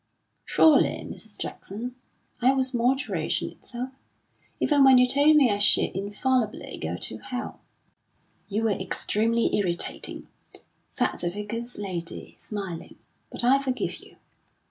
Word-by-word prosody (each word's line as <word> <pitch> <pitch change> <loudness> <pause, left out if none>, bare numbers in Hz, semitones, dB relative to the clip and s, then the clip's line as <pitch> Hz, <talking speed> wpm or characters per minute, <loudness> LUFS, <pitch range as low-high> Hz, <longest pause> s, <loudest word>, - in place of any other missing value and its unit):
"Surely, 315 -3 +4
Mrs. - - -7
Jackson, 235 +5 -6 0.5
I 255 +3 +5
was 260 0 0
moderation 250 +3 0
itself? 250 +1 -7 0.7
even 290 -2 +4
when 265 -1 +8
you 250 - +6
told 285 +4 +5
me 275 -6 +5
I 200 - 0
should 205 - +4
infallibly 215 +4 -1
go - - -3
to - - -5
Hell." 250 -1 -6 0.9
"You 215 +2 -1
were 225 - +2
extremely 220 +4 0
irritating," 180 -4 -2 0.6
said - - -1
the 175 - 0
Vicar's 230 +5 -5
lady, 180 -4 -5
smiling, 195 -6 -6 0.3
"but - - -3
I 265 +3 +5
forgive 260 -2 -2
you. - - -16
235 Hz, 125 wpm, -26 LUFS, 205-260 Hz, 0.9 s, when